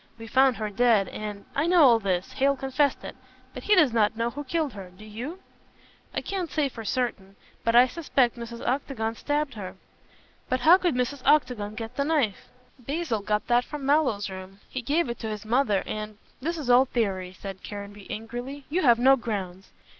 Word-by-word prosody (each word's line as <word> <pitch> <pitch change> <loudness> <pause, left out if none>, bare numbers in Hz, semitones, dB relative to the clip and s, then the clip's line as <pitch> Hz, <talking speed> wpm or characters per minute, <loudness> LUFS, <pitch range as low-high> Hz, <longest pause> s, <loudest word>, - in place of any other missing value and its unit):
We 225 - -9
found 260 +2 +3
her 215 -1 -3
dead, 220 -3 +3
and 210 -1 -6
" - - -27
"I 290 +4 +1
know 350 -2 +6
all 240 -4 +6
this. 185 -3 -1
Hale 275 +1 +2
confessed 270 +1 0
it. - - -7 0.4
But - - -7
he 415 - +5
does 305 -10 +4
not 220 -1 +2
know 230 +1 0
who 290 +4 -6
killed 300 0 -1
her. 195 -3 -9
Do 185 +4 -15
you?" 250 - -7 0.7
"I - - -2
can't 375 -4 -3
say 300 -3 0
for 230 -3 -8
certain. 210 -4 -2 0.3
But 230 0 +1
I 245 +1 +8
suspect 270 -5 +1
Mrs. 235 0 -7
Octagon 250 -4 -1
stabbed 290 +4 -2
her." 190 -3 -7 0.7
"But 255 0 0
how 340 +7 +7
could 350 -8 +1
Mrs. 250 +2 -1
Octagon 250 -8 +2
get 225 +1 -7
the 280 - +2
knife?" 280 -10 0 0.3
"Basil 280 -2 -2
got 210 +1 -1
that 240 0 +3
from 290 +1 -7
Mallow's 275 -8 +2
room. 190 +1 -9
He 260 - -5
gave 290 +6 +1
it 235 - -5
to 220 - -4
his 210 0 -6
mother, 220 -4 +2
and 215 -1 -5
" - - -34
"This 335 +5 -2
is 295 -5 -5
all 250 +2 +6
theory," 195 -8 -2
said 195 -1 -7
Caranby 205 -1 -8
angrily, 245 +5 -6
"you 360 +4 +1
have 240 -7 +5
no 265 +3 +6
grounds." 195 -6 -5
240 Hz, 205 wpm, -26 LUFS, 210-280 Hz, 0.7 s, I